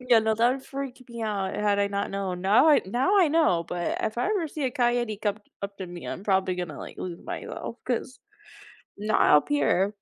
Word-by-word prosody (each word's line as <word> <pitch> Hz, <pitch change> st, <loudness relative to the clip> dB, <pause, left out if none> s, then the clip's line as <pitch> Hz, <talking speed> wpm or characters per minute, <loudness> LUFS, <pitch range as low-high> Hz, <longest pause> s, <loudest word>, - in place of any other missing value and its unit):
Yeah, 250 Hz, -2 st, +5 dB
no, 220 Hz, 0 st, +1 dB
that 235 Hz, +3 st, +3 dB
would 265 Hz, 0 st, -6 dB
freak 270 Hz, -2 st, -6 dB
me 235 Hz, -1 st, -6 dB
out 200 Hz, -3 st, -2 dB
had 205 Hz, -1 st, +1 dB
I 200 Hz, -, +3 dB
not 200 Hz, 0 st, -2 dB
known. 190 Hz, -2 st, -3 dB
Now 210 Hz, +11 st, +5 dB
I 295 Hz, -, +6 dB
Now 260 Hz, -, +2 dB
I 345 Hz, -5 st, +5 dB
know, 295 Hz, -, +3 dB
but 175 Hz, 0 st, -2 dB
if 220 Hz, +2 st, -2 dB
I -, -, +1 dB
ever 390 Hz, -7 st, 0 dB
see 295 Hz, -1 st, -4 dB
a 260 Hz, -, +1 dB
coyote 240 Hz, -4 st, 0 dB
come 205 Hz, -2 st, 0 dB
t 215 Hz, -, -19 dB, 0.2 s
up 200 Hz, 0 st, -5 dB
to 190 Hz, -, -5 dB
me, 175 Hz, 0 st, -9 dB
I'm 195 Hz, -, -6 dB
probably 190 Hz, -2 st, +2 dB
gonna, 175 Hz, -5 st, -5 dB
like, -, -, -9 dB
lose 175 Hz, -2 st, -5 dB
myself -, -, -6 dB
'cause 255 Hz, +1 st, -2 dB, 0.8 s
not 210 Hz, +1 st, +1 dB, 0.2 s
up 150 Hz, -, +1 dB
here. 210 Hz, -9 st, +2 dB
215 Hz, 230 wpm, -26 LUFS, 190-255 Hz, 0.8 s, I